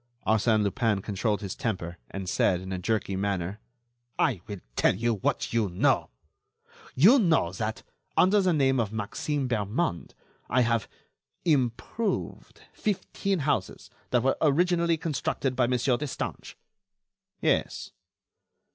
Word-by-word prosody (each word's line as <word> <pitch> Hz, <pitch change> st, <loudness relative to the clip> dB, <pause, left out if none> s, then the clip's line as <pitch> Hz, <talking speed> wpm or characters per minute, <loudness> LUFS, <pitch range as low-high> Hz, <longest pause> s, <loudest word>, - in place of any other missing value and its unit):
Arsène 110 Hz, 0 st, +3 dB
Lupin 105 Hz, +1 st, +1 dB
controlled 105 Hz, +1 st, -1 dB
his 100 Hz, -3 st, -4 dB
temper 90 Hz, -6 st, -4 dB
and 95 Hz, -1 st, -6 dB
said, 90 Hz, 0 st, +2 dB
in 95 Hz, +1 st, -7 dB
a 90 Hz, -, -3 dB
jerky 100 Hz, 0 st, -1 dB
manner: 95 Hz, 0 st, -2 dB, 0.6 s
"I 105 Hz, -10 st, +1 dB
will 105 Hz, -2 st, -5 dB, 0.2 s
tell -, -, +3 dB
you 115 Hz, +4 st, +1 dB
what 105 Hz, -, -1 dB
you 110 Hz, -4 st, +2 dB
know. 90 Hz, -, +2 dB, 0.9 s
You 210 Hz, -, +7 dB
know 165 Hz, -, +3 dB
that, 110 Hz, +4 st, -4 dB, 0.3 s
under 200 Hz, +3 st, +5 dB
the 185 Hz, -1 st, +2 dB
name 135 Hz, -4 st, +2 dB
of 110 Hz, -3 st, 0 dB
Maxime 130 Hz, +6 st, -2 dB
Bermond, 110 Hz, -, -2 dB, 0.3 s
I 125 Hz, +2 st, +3 dB
have... 115 Hz, -3 st, +1 dB, 0.6 s
improved 150 Hz, -, -1 dB
fifteen 195 Hz, -2 st, -2 dB
houses 140 Hz, -11 st, -2 dB, 0.2 s
that 125 Hz, -2 st, +2 dB
were 135 Hz, -, +2 dB
originally 170 Hz, +2 st, +3 dB
constructed 140 Hz, -4 st, -2 dB
by 125 Hz, -1 st, +2 dB
Monsieur 125 Hz, 0 st, +1 dB
Destange." 150 Hz, -1 st, -5 dB, 0.8 s
"Yes." -, -, 0 dB
115 Hz, 130 wpm, -27 LUFS, 100-150 Hz, 0.9 s, You